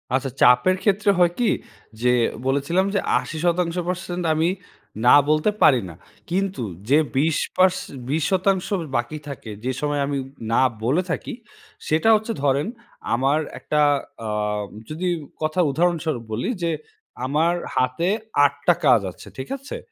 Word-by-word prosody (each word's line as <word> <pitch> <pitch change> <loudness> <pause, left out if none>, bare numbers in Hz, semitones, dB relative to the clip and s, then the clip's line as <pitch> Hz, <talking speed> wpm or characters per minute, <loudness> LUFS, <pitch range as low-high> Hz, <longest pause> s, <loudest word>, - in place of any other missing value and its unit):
আচ্ছা, 135 0 -1
চাপের 125 +9 +5
ক্ষেত্রে 205 0 +3
হয় 175 -1 +5
কি 240 - +3 0.5
যে 125 - +3 0.4
বলেছিলাম 140 +8 +1
যে - - +3 0.2
৮০% 175 +2 -2
আমি 160 +2 +2 0.6
না 125 - +8
বলতে 155 +6 +3
পারি 130 -5 +6
না। 80 - -11 0.3
কিন্তু 190 -5 -1 0.3
যে 145 - +6 0.2
২০ 155 +2 +2 0.2
পারস 185 0 +4 0.3
২০% 185 +5 +1 0.3
বাকি 120 +6 -3
থাকে 130 -6 -7
যে 130 - +1
সময় 145 -1 0
আমি 140 -1 -1 0.3
না 115 - +4 0.2
বলে 140 +10 +2
থাকি। - - -3 0.5
সেটা 160 +8 +2
হচ্ছে 220 +2 -1
ধরেন 140 +5 +2 0.5
আমার 135 +5 +2 0.2
একটা 150 0 0 0.5
আম 105 -1 -1 0.2
যদি 165 +4 -3 0.3
কথা 155 +3 -1
উদাহরণস্বরূপ 160 -5 0
বলি 110 - -2
যে 170 - +1 0.5
আমার 155 +6 +2 0.2
হাতে 130 +8 +1 0.4
৮ 140 - +2
টা 175 - +7
কাজ 120 -6 +6
আছে, - - -14
ঠিক 130 - -6
আছে? 275 +2 -7
155 Hz, 140 wpm, -23 LUFS, 135-180 Hz, 0.6 s, না